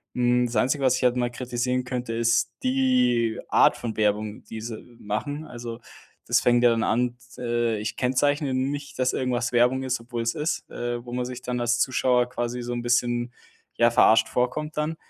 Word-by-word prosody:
Hm, 125 0 +2
das 120 -1 -3
Einzige, 135 +5 +1
was 130 -1 +3
ich - - -4
halt 125 0 +3
mal 120 -1 0
kritisieren 125 +1 -2
könnte, 125 -2 -4
ist 115 +1 +1
die 255 - +2
Art - - +4
von 115 -2 -5
Werbung, 105 0 -1
die 110 - -8
sie 115 +1 -8
machen. 145 +9 -4
Also, 120 -1 -7 0.5
das - - +4
fängt 120 0 +3
ja 120 - +7
dann 115 -1 +1
an, 120 +1 0 0.2
d - - -9
äh, 120 -2 0
ich 105 0 -4
kennzeichne 135 +2 +1
nicht, 140 +2 -3
dass 130 0 +2
irgendwas 125 -2 -1
Werbung 125 +2 +3
ist, 130 -2 -1
obwohl 120 0 -5
es 115 0 -1
ist, 155 +3 -2
äh, 120 0 -4
wo 120 - -10
man 125 0 -2
sich 125 0 -7
dann 125 -1 -3
als 120 0 +1
Zuschauer 125 -1 +2
quasi 120 0 -3
so 120 0 -5
'n 120 - -3
bisschen, 120 0 0 0.4
ja, 115 - +4
verarscht 115 -1 +4
vorkommt 150 +5 -2
dann. 150 +2 -1
120 Hz, 200 wpm, -25 LUFS, 120-125 Hz, 0.5 s, ja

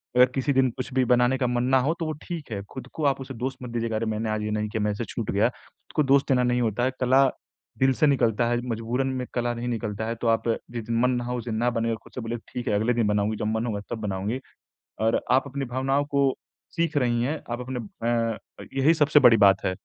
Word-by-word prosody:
अगर 125 0 +8
किसी 140 +2 +1
दिन 130 -1 +3
कुछ 130 +1 -5
भी 130 0 +3
बनाने 125 +2 +3
का 125 -2 0
मन 120 0 0
ना 130 +1 +4
हो 145 +6 +1
तो 165 - -1
वो 155 - -2
ठीक 165 -8 -6
है, 100 -2 -3
खुद 130 -1 -8
को 155 - -4
आप 135 -1 +2
उसे 135 0 -7
दोष 130 +3 -3
मत 125 - -6
दीजिए 115 -1 -2
कि 110 - -2
अरे 110 +1 -1
मैंने 110 0 -2
आज 110 0 -1
ये 105 - -2
नहीं 105 0 -1
किया, 110 0 -2
मेरे 105 -1 0
से 120 - -3
ये - - -5
छूट 115 -3 -3
गया। 105 +4 +3
खुद - - -21
को 150 - +4
दोष 135 0 +4
देना 125 -2 +3
नहीं 125 0 +1
होता 115 +1 0
है, 130 - +2
कला 130 +2 +5 0.5
दिल 130 0 +4
से 150 +4 +3
निकलता 120 -4 +2
है, 120 - +1
मजबूरन 115 +4 -1
में 130 -1 -3
कला 120 -1 0
नहीं 120 +1 -4
निकलता 110 -2 -3
है। 115 - -2
तो 120 - 0
आप 115 +1 +2 0.2
जिस 120 -2 -4
दिन 115 0 0
मन 125 +1 +3
ना 120 -1 -1
हो, 125 0 -2
उस 120 - -6
दिन 115 -2 -3
ना 120 +2 +2
बनाएँ 115 0 0
और 110 - -3
खुद - - -17
से 125 - -4
बोलिए 115 +1 -3 0.2
ठीक 125 - -4
है - - +1
अगले 110 +4 +2
दिन 115 -2 +1
बनाऊँगी, 105 +1 +1
जब 105 - -2
मन 110 +1 -1
होगा 105 -3 -2
तब 120 - -2
बनाऊँगी 105 +4 -2 0.6
और 110 +1 +2
आप 130 +2 +4
अपनी 140 +1 -4
भावनाओं 135 +3 0
को 140 -2 +2 0.4
सीख 165 -3 +1
रही 120 -3 +2
हैं। 150 +4 -2
आप 120 - -2
अपने 125 0 -4 0.3
अ 115 -2 0 0.2
अ, - - -7
यही 135 +4 +4
सबसे 150 -2 +4
बड़ी 120 -4 +7
बात 95 -1 +4
है। 95 - +2
120 Hz, 280 wpm, -25 LUFS, 115-130 Hz, 0.6 s, अगर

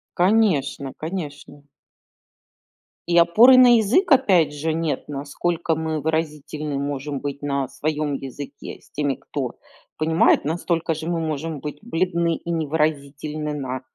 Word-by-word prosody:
Конечно, 175 -9 +2
конечно. 150 -4 -7 1.4
И 175 0 +2
опоры 225 +10 +7
на 245 -2 +8
язык 250 - +2
опять 185 - +4
же 155 +2 -2
нет, 160 -3 -2
на 145 -2 -5
насколько 160 +3 -1
мы 160 -1 -2
выразительны 150 -2 -2
можем 140 0 -3
быть 145 0 -5
на 140 -2 -1
своем 150 -1 -2
языке 140 +1 -7
с - - -23
теми, 145 -2 -1
кто 135 -4 -5 0.4
понимает, 160 +1 +3
настолько 165 +1 -1
же 160 +1 -6
мы 170 -1 -1
можем 155 -1 -3
быть 150 +1 -6
бледны 170 -5 0
и 170 - -9
невыразительны 150 -1 -2
на 130 -3 -4
155 Hz, 135 wpm, -22 LUFS, 145-170 Hz, 1.4 s, на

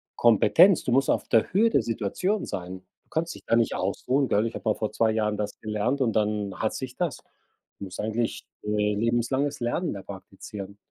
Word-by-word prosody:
Kompetenz, 160 - +5
du 125 - -2
musst 135 +2 +3
auf - - +1
der 115 -2 +3
Höhe 225 +4 +3
der 135 - +3
Situation 120 - -1
sein. 90 +1 -6 0.2
Du - - -41
kannst 165 +1 -2
dich - - -12
da 115 - +3
nicht 115 -1 +2
ausruhen, 135 +1 0
gell, 105 +2 +2
ich 115 - -3
habe - - -6
mal - - +2
vor 110 - -3
2 110 -1 +2
Jahren 105 -1 0
das 105 -1 -4
gelernt 110 +6 -1
und 115 -4 +2
dann 105 -2 0
hat 110 - -1
sich 130 -1 -6
das. 175 -6 -1 0.6
Du 100 - -5
musst 95 - -9
eigentlich, 110 +2 -2 0.2
äh, 105 0 +1
lebenslanges 120 +6 0
Lernen 120 +8 -1
da 100 - -8
praktizieren. 100 +1 -9
115 Hz, 205 wpm, -26 LUFS, 105-130 Hz, 0.6 s, Kompetenz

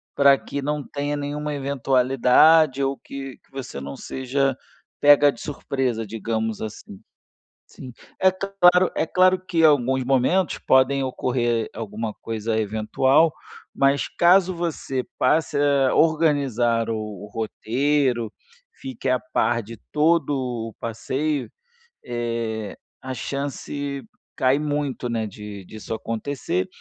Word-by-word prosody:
pra 140 -1 +6
que 140 - -5
não 150 +1 -2
tenha 145 0 -3
nenhuma 145 +1 -3
eventualidade 135 +2 +3
ou 135 0 0
que 135 -2 -8
que - - -33
você 130 - -7
não 70 +1 -6
seja 135 +1 -1 0.5
pega 145 0 +7
de - - -13
surpresa, 130 -6 -2
digamos 110 0 -3
assim, 105 -2 -8 0.7
sim, 130 -2 -11 0.3
é 190 0 +5
claro 185 -1 +3
é - - +1
claro 185 +2 +4
que 165 -2 +1
alguns 130 -4 +4
momentos 135 +7 +1
podem 130 +1 +4
ocorrer 120 -3 -1
alguma 110 0 -5
coisa 110 0 -2
eventual, 110 +9 +2 0.4
mas 140 +1 +2
caso 185 +2 +5
você 165 -7 -3
passe 150 +3 +1
a 140 -2 +3
organizar 140 -8 +2
o 115 - -1 0.3
o - - -10
roteiro, 120 +1 0 0.4
fique 260 - -6
a 130 -1 +2
par 120 -1 +1
de 115 +2 -10 0.2
todo 155 0 +2 0.4
o - - -21
passeio, 135 +5 -2 0.6
eh, 115 -3 -3 0.2
a 130 - -5
chance 140 +1 -4 0.3
cai 130 +1 +3
muito, 145 -4 -2
né, 115 -2 -1
de 105 -1 -9
disso 110 +3 -7
acontecer 110 -4 -3
135 Hz, 125 wpm, -23 LUFS, 115-145 Hz, 0.7 s, pega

